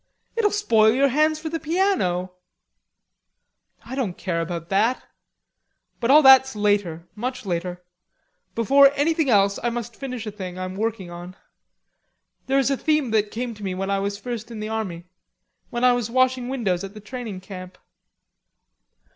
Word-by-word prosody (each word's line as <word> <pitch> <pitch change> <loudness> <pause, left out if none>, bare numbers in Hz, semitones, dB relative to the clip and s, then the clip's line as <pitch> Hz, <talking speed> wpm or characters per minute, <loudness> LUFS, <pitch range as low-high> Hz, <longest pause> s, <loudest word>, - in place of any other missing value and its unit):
"It'll 450 -3 +3
spoil 230 - +3
your 275 +2 +3
hands 305 +4 +2
for 315 +1 -5
the 330 +1 -3
piano." 315 - 0 1.5
"I 240 - -8
don't 240 -10 -2
care 170 -3 -2
about 165 0 -5
that; 220 +6 +2 1.0
but 235 - -1
all 300 +3 +7
that's 265 -2 +7
later, 200 -5 0
much 250 +2 -5
later. 180 0 -3 0.7
Before 275 +5 +6
anything 310 0 +1
else 200 -3 +3
I 240 - 0
must 235 -1 -5
finish 255 -5 -6
a 215 - -4
thing 185 -3 -7
I 185 - -4
am 185 0 -6
working 210 -4 -3
on. 175 +1 -9 1.1
There 270 +1 +2
is 275 0 +2
a 275 - +1
theme 305 -5 +1
that 215 -1 +2
came 240 +2 -4
to 210 -1 -12
me 190 -2 -3
when 195 +1 -3
I 195 - +1
was 200 +1 -2
first 230 0 -6
in 230 -2 -7
the 215 0 -4
army, 190 -6 -4 0.6
when 240 +1 -3
I 250 0 +6
was 240 -2 -2
washing 255 0 +1
windows 200 -9 -1
at 195 +1 -8
the - - -8
training 215 -3 -7
camp." 185 -1 -10
220 Hz, 170 wpm, -23 LUFS, 190-265 Hz, 1.5 s, all